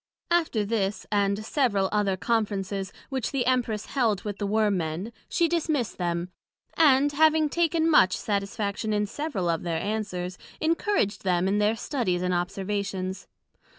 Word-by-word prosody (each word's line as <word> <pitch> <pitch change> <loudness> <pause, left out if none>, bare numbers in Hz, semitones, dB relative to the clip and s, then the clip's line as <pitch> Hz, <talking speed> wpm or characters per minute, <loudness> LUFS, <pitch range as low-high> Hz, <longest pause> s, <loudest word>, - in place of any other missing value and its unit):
After 320 -11 +2
this, 200 -2 -1
and 200 0 +1
several 220 -8 +1
other 205 -3 +1
Conferences, 200 -3 -1 0.2
which 265 -5 -2
the 265 -3 0
Empress 235 -4 0
held 225 -8 0
with 205 -2 -5
the 205 - -1
Worm 210 -1 +2
men, 170 +7 -3 0.2
she 340 - +2
dismissed 310 -10 -1
them; 175 0 -2 0.4
and 285 -2 +5
having 310 +1 +4
taken 330 0 +1
much 185 - +5
satisfaction 205 +1 -2
in 210 0 +1
several 225 - -3
of 165 -1 0
their 170 -2 -2
Answers, 185 -4 -3 0.2
encouraged 330 - 0
them 180 -1 +1
in 200 +2 +1
their 210 +2 +2
Studies 210 -9 -1
and 180 0 0
Observations. 190 +1 -3
210 Hz, 150 wpm, -26 LUFS, 190-260 Hz, 0.4 s, and